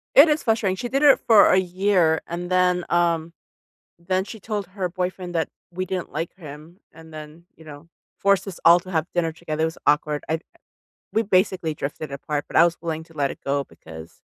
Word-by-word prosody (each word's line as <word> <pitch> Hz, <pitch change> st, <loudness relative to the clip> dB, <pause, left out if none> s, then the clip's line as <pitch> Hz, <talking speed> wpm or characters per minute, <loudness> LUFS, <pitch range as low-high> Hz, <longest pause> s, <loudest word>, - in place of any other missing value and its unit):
It 295 Hz, +4 st, +9 dB
is 300 Hz, 0 st, +1 dB
frustrating, 220 Hz, -5 st, +1 dB
she 240 Hz, +5 st, -5 dB
did 275 Hz, +3 st, 0 dB
it 285 Hz, -2 st, +7 dB
for 225 Hz, -3 st, +7 dB
a -, -, +5 dB
year, 185 Hz, -3 st, +2 dB
and 175 Hz, +1 st, -5 dB
then, 180 Hz, -1 st, +2 dB
um, 170 Hz, -1 st, +1 dB, 0.7 s
then 185 Hz, +2 st, -1 dB
she 220 Hz, +2 st, -10 dB
told 205 Hz, -1 st, -4 dB
her 185 Hz, -1 st, -4 dB
boyfriend 180 Hz, -1 st, -4 dB
that 160 Hz, -, 0 dB, 0.2 s
we 185 Hz, +2 st, -3 dB
didn't 185 Hz, -1 st, -4 dB
like 160 Hz, +3 st, -4 dB
him 155 Hz, +1 st, -12 dB
and 160 Hz, 0 st, -15 dB
then, 155 Hz, +2 st, -11 dB
you 160 Hz, -, -17 dB
know, 150 Hz, +1 st, -12 dB, 0.3 s
forced 200 Hz, 0 st, +2 dB
us 190 Hz, -, -7 dB
all 170 Hz, +1 st, +8 dB
to 185 Hz, -, -11 dB
have 160 Hz, -3 st, 0 dB
dinner 170 Hz, -2 st, 0 dB
together, 160 Hz, -1 st, -5 dB
it -, -, +4 dB
was 160 Hz, -, -5 dB
awkward. 150 Hz, 0 st, +1 dB
I 160 Hz, +1 st, 0 dB, 0.7 s
we 225 Hz, -, +2 dB
basically 185 Hz, -4 st, +1 dB
drifted 150 Hz, +2 st, -5 dB
apart, 145 Hz, +1 st, -4 dB
but -, -, -10 dB
I 165 Hz, -, +7 dB
was 170 Hz, 0 st, +1 dB
willing 160 Hz, -1 st, -4 dB
to 165 Hz, -, -20 dB
let 140 Hz, -3 st, -1 dB
it -, -, -11 dB
go 140 Hz, 0 st, 0 dB
because 80 Hz, -5 st, -13 dB
170 Hz, 210 wpm, -23 LUFS, 160-185 Hz, 0.7 s, It